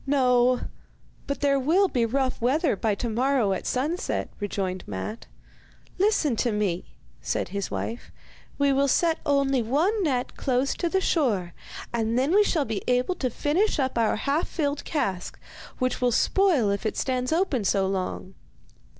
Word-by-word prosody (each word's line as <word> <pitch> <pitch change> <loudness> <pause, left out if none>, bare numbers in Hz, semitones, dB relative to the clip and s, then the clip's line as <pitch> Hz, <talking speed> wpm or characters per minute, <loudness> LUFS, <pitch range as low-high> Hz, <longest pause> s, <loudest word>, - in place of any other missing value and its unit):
'No; 250 -2 +3 0.7
but 280 - -3
there 280 -1 +3
will 340 +9 +3
be 240 -8 0
rough 260 +1 -1
weather 275 - +2
by 210 +1 0
to 235 - -3
morrow 240 -2 +1
at 190 - -4
sunset,' 300 +8 -2
rejoined 190 -2 -3
Matte. 105 - -6 0.7
'Listen 370 - +2
to 240 - +1
me,' 205 -5 -2 0.3
said - - -2
his 200 0 -3
wife, 230 +2 -5 0.5
'we 280 -1 +3
will 275 +1 +2
set 325 +4 +2
only 275 -2 +2
one 320 - +1
net 260 -8 -1
close 260 +1 0
to 345 - -2
the 380 +2 +1
shore, 210 - 0 0.4
and 230 0 0
then 270 +6 +2
we 415 +1 +6
shall 320 -8 +1
be 215 -3 -3
able 250 +7 +2
to 265 -7 -2
finish 315 - 0
up 265 -2 -1
our 230 -2 +2
half 280 +8 0
filled 290 -3 -2
cask, 195 - -2 0.4
which 255 0 -1
will 250 -1 +3
spoil 300 - +3
if 200 - -2
it 215 - -2
stands 255 0 -1
open 320 - +1
so 195 0 +2
long. 190 0 -3
255 Hz, 165 wpm, -26 LUFS, 220-290 Hz, 0.7 s, we